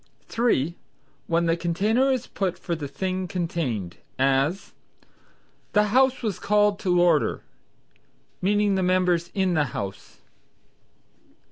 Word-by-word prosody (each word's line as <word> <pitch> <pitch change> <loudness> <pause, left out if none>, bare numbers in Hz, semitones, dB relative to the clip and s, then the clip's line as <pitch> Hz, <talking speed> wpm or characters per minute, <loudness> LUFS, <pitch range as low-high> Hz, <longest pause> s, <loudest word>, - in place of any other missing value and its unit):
(3) 170 - +1 0.5
When 170 0 +1
the 165 0 +2
container 205 +10 +1
is 255 -2 -1
put 190 -3 -3
for 175 - -4
the 150 -3 -4
thing 185 +4 -3
contained; 165 - -3 0.2
as 135 +7 +1 1.0
"The 210 0 +3
House 260 0 +3
was 210 -5 -2
called 210 -1 +2
to 180 -2 +1
order," 170 -4 +2 1.0
meaning 205 +1 +2
the 190 - +1
members 180 -2 +1
in 190 -2 +1
the 155 -3 +2
House. 100 0 -7
180 Hz, 120 wpm, -25 LUFS, 165-205 Hz, 1.0 s, The